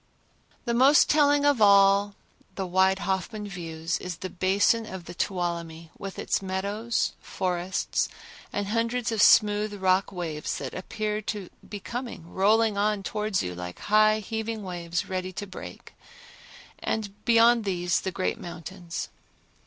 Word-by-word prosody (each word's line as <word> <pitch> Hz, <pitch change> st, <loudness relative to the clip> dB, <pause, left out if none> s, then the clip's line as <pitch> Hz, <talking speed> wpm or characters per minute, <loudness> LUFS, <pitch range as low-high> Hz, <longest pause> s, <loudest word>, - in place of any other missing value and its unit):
The 235 Hz, -, 0 dB
most 265 Hz, +5 st, +6 dB
telling 290 Hz, -1 st, +4 dB
of 285 Hz, -5 st, +3 dB
all 200 Hz, 0 st, +5 dB, 0.4 s
the 190 Hz, -, -2 dB
wide 190 Hz, +1 st, +3 dB
Hoffman 200 Hz, +2 st, -3 dB
views 165 Hz, -3 st, -4 dB
is 180 Hz, -2 st, -6 dB
the 185 Hz, +2 st, -6 dB
basin 200 Hz, +5 st, +2 dB
of 190 Hz, -2 st, -8 dB
the 175 Hz, -, -8 dB
Tuolumne 170 Hz, -3 st, -3 dB
with 195 Hz, -1 st, -7 dB
its -, -, -1 dB
meadows, 200 Hz, +5 st, -1 dB
forests 180 Hz, 0 st, -1 dB, 0.4 s
and 205 Hz, -1 st, -2 dB
hundreds 230 Hz, +2 st, 0 dB
of 220 Hz, -2 st, +1 dB
smooth 210 Hz, -1 st, +5 dB
rock 190 Hz, 0 st, +2 dB
waves 165 Hz, -5 st, -4 dB
that 135 Hz, -2 st, -6 dB
appear 210 Hz, +3 st, -3 dB
to 205 Hz, -3 st, -5 dB, 0.2 s
be 205 Hz, -, -5 dB
coming 235 Hz, -5 st, -6 dB
rolling 210 Hz, +2 st, +3 dB
on 210 Hz, -1 st, +1 dB
towards 210 Hz, -1 st, -1 dB
you 90 Hz, -, -4 dB
like 90 Hz, 0 st, -7 dB
high 215 Hz, +1 st, +3 dB
heaving 220 Hz, +1 st, -4 dB
waves 175 Hz, -1 st, -3 dB
ready 185 Hz, 0 st, -3 dB
to 205 Hz, -, -5 dB
break, 190 Hz, -, -10 dB, 0.9 s
and 205 Hz, -2 st, -4 dB
beyond 235 Hz, 0 st, +5 dB
these 175 Hz, -4 st, 0 dB
the 190 Hz, -, -2 dB
great 185 Hz, 0 st, -2 dB
mountains. 175 Hz, 0 st, -6 dB
195 Hz, 145 wpm, -27 LUFS, 180-215 Hz, 0.9 s, most